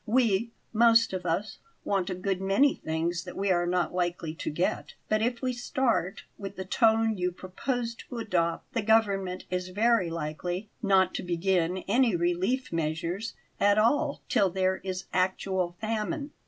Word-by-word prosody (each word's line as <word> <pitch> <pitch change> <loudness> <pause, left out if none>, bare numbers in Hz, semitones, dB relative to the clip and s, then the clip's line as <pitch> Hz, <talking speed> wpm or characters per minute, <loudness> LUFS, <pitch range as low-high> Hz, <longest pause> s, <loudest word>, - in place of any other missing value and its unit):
"We 230 -2 +2 0.2
most 230 -1 +5
of 180 -1 -3
us 195 +6 -2 0.2
want 195 -2 0
a 185 - -2
good 190 +1 -2
many 200 +9 +4
things 165 +2 -2
that - - -8
we 195 0 +1
are 175 -1 +2
not 180 -1 0
likely 175 -3 -1
to 165 - -4
get; 170 +5 -2
but 215 0 +2
if 240 +2 -1
we 255 -1 0
start 240 -6 -1 0.2
with 200 -1 -6
the 190 - -5
tone 225 0 +3
you 180 0 0
propose 230 +7 -3 0.2
to 245 - -6
adopt, 175 -7 -1
the 230 - 0
government 200 -4 +1
is 180 0 -2
very 215 -1 +2
likely 170 +5 -4
not 190 -3 +3
to - - -3
begin 180 0 +1
any 235 0 +3
relief 175 +9 0
measures 165 +6 -2 0.2
at 205 +1 +4
all 280 +7 +2
till 195 - +3
there 190 +1 +1
is 185 0 -5
actual 185 -1 0
famine. 225 +7 -2
190 Hz, 165 wpm, -28 LUFS, 180-225 Hz, 0.2 s, most